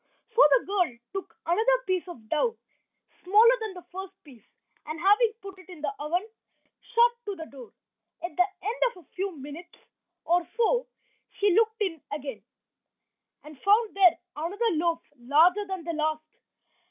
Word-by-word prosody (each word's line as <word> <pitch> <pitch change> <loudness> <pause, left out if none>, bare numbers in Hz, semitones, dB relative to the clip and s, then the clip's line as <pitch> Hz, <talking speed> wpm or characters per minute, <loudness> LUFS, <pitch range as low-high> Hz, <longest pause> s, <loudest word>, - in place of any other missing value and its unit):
So 465 - +4 0.2
the - - -7
girl 360 -11 0 0.2
took 390 -1 -6
another 475 +8 +2
piece 370 -1 -1
of 240 -11 -11
dough, 455 +10 +1 0.7
smaller 435 +6 +6
than 435 -4 -5
the 360 - -11
first 380 +1 -7
piece, 250 -8 -16 0.4
and 310 +1 -5
having 415 +5 +4
put 390 -1 -9
it 370 - -17
in 350 -5 -11
the 290 -2 -2
oven, 345 +8 -1 0.7
shut 475 +1 +6
to 405 -1 -4
the 325 -3 -7
door. 260 -7 -12 0.5
At 345 -3 -5
the 360 +2 +4 0.2
end 445 +5 -3
of 360 -8 -16
a - - -41
few 380 -3 -3
minutes 295 +6 -10 0.5
or 345 0 +2
so 480 +2 +2 0.5
she 405 -2 +3
looked 445 +2 +2
in 340 -7 -1
again, 275 -7 -5 1.0
and 300 -3 -13
found 425 +2 +3
there 370 -4 +6 0.2
another 405 +9 -1
loaf, 335 0 0 0.2
larger 330 +11 +4
than 380 -3 -5
the 335 +1 -3
last. 310 0 -1
360 Hz, 165 wpm, -27 LUFS, 310-415 Hz, 1.0 s, smaller